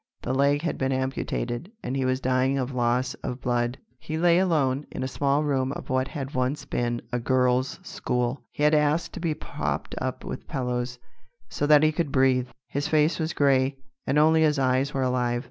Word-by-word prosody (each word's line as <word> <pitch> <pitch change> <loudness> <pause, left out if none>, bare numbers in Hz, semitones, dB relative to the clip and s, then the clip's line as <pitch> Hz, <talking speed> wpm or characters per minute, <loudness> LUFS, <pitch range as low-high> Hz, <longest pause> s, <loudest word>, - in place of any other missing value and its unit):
The 130 - -1
leg 140 +2 +2
had 170 - -2
been 135 0 0
amputated, 130 - -2
and 130 - -3
he 135 -1 0
was 130 0 +1
dying 130 +1 +1
of 130 0 -2
loss 125 +1 +1
of 125 - -4
blood. 120 0 0 0.2
He 155 - -4
lay 170 +1 +4
alone, 150 -7 +1
in - - -5
a - - -1
small 140 +2 +1
room 135 -3 0
of - - -7
what 130 0 +1
had 140 -1 -6
once 130 +2 -1
been 120 0 -2
a 125 - +1
girls' 125 +2 +1
school. 125 -6 -2
He 150 - -4
had 150 +1 +5
asked 150 +2 +2
to - - -6
be 165 -3 -1
propped - - -4
up - - -3
with - - -6
pillows, 125 -1 -2 0.5
so 145 - -1
that 150 0 +6
he 155 - +5
could 155 -2 -2
breathe. 130 -2 +3 0.2
His 145 +1 -2
face 155 +1 +2
was 160 0 -1
grey, 135 -1 +2 0.3
and 145 - +2
only 160 +1 +5
his 150 -2 +3
eyes 130 +1 +1
were 135 -2 -1
alive. 125 -1 +1
135 Hz, 200 wpm, -26 LUFS, 125-150 Hz, 0.5 s, that